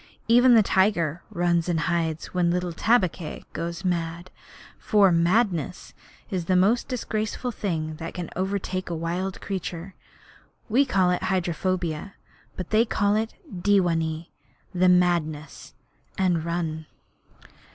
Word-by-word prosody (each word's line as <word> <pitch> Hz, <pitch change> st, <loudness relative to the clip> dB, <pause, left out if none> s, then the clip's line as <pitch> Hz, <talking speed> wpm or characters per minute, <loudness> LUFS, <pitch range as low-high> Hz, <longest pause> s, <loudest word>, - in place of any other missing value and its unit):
Even 245 Hz, +1 st, +6 dB
the 220 Hz, -, +6 dB
tiger 180 Hz, -5 st, +1 dB
runs 175 Hz, 0 st, +1 dB
and 165 Hz, -2 st, +1 dB
hides 165 Hz, -2 st, -1 dB
when 180 Hz, -1 st, +2 dB
little 180 Hz, 0 st, -1 dB
Tabaqui 185 Hz, -6 st, 0 dB
goes 170 Hz, +3 st, -4 dB
mad, 170 Hz, 0 st, -2 dB, 0.5 s
for 205 Hz, -4 st, +4 dB
madness 175 Hz, -, +1 dB, 0.4 s
is 180 Hz, -3 st, -2 dB
the 185 Hz, -, +2 dB
most 205 Hz, +7 st, +3 dB
disgraceful 235 Hz, -1 st, -3 dB
thing 160 Hz, -8 st, -3 dB
that 165 Hz, +1 st, -7 dB
can 175 Hz, -2 st, -5 dB
overtake 185 Hz, -1 st, -2 dB
a 170 Hz, -, -2 dB
wild 175 Hz, +4 st, -3 dB
creature. 185 Hz, -1 st, -5 dB, 0.7 s
We 255 Hz, +6 st, +3 dB
call 185 Hz, -6 st, +3 dB
it 180 Hz, -, 0 dB
hydrophobia, 185 Hz, -1 st, -1 dB, 0.4 s
but 185 Hz, -, -6 dB
they 220 Hz, +1 st, +5 dB
call 205 Hz, -3 st, +1 dB
it 220 Hz, +1 st, -1 dB
dewanee 175 Hz, -, 0 dB, 0.4 s
the 185 Hz, 0 st, +4 dB
madness 170 Hz, -4 st, 0 dB, 0.4 s
and 180 Hz, -4 st, +1 dB
run. 160 Hz, -2 st, -3 dB
180 Hz, 125 wpm, -25 LUFS, 170-195 Hz, 0.7 s, Even